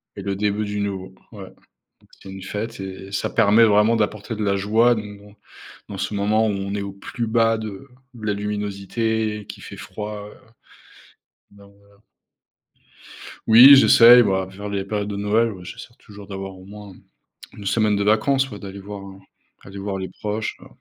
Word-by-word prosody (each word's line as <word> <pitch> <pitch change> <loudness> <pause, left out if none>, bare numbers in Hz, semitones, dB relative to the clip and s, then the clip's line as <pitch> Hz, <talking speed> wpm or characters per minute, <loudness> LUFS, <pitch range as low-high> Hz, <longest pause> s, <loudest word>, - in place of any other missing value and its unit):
Et - - -7
le 100 -1 -2
début 105 +1 -1
du 105 0 -4
nouveau, 95 -2 -4 0.2
ouais. 95 -3 -10 0.7
C'est 95 - -10
une 95 - -9
fête 105 +3 -5
et 95 +1 -8
ça - - -1
permet 110 +1 +4
vraiment 105 +1 +4
d'apporter 105 +1 -2
de 110 - -5
la 100 -1 +1
joie 110 +5 +3
donc 105 -2 -7
dans 105 0 -17 0.5
dans 100 - -8
ce 100 +3 -3
moment 105 +2 +1
où 105 - 0
on 100 0 -4
est 100 - -2
au 100 - -5
plus 100 +4 -5
bas 115 0 +2
de 110 +4 -8 0.3
la 105 -1 -2
luminosité 105 +2 -2
et 105 - -10
qu'il - - -10
fait - - -10
froid, 105 -1 -7 1.2
donc 100 0 -18
voilà. 100 0 -25 1.5
Oui, 125 +5 +10
j'essaye, 120 -2 +8
voilà, 95 -3 +1
vers 100 +2 -8
les 100 -1 -2
périodes 105 0 -3
de 100 - -4
Noël. 110 +3 +1
Ouais, 90 -3 -11
j'essaie 120 +5 -10
toujours 100 -2 -14
d'avoir 95 -1 -7
au 95 - -14
moins 100 -1 -11 0.6
1 100 - -11
semaine 105 0 +2
de 100 - -1
vacances, 135 +6 +2
ouais, 105 - -8
d'aller 100 0 -9
voir 100 0 -8 0.6
aller 95 +1 -11
voir 100 0 -4
les 95 - -5
proches, 105 +1 -4
heu - - -14
105 Hz, 180 wpm, -22 LUFS, 100-110 Hz, 1.5 s, Oui